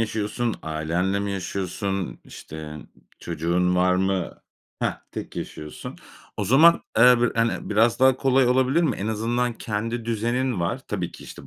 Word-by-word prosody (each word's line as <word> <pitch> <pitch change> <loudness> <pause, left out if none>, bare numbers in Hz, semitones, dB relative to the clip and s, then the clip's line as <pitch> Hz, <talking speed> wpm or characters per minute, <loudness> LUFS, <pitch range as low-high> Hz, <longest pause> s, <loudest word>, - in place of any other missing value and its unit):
yaşıyorsun, 110 +1 -1
ailenle 85 +5 -1
mi 100 0 -2
yaşıyorsun, 95 0 -3
işte, 75 -1 -9 0.4
çocuğun 90 +3 0
var 90 0 +3
mı? 95 -1 -1 0.4
Hah, - - -1
tek - - -7
yaşıyorsun. 75 0 -7 0.4
O - - -1
zaman, 160 +7 +6 0.2
eee, 125 +1 +7
bi 120 - +3
hani, 115 0 0
biraz 115 +3 +3
daha 130 0 +5
kolay 135 -1 +3
olabilir 130 +6 +3
mi? 160 - +1
En 100 - -4
azından 120 +3 0
kendi 115 +1 -3
düzenin 120 0 -1
var 85 - -1
Tabii - - -3
ki, - - -12
işte, 70 - -11
110 Hz, 150 wpm, -24 LUFS, 90-120 Hz, 0.4 s, eee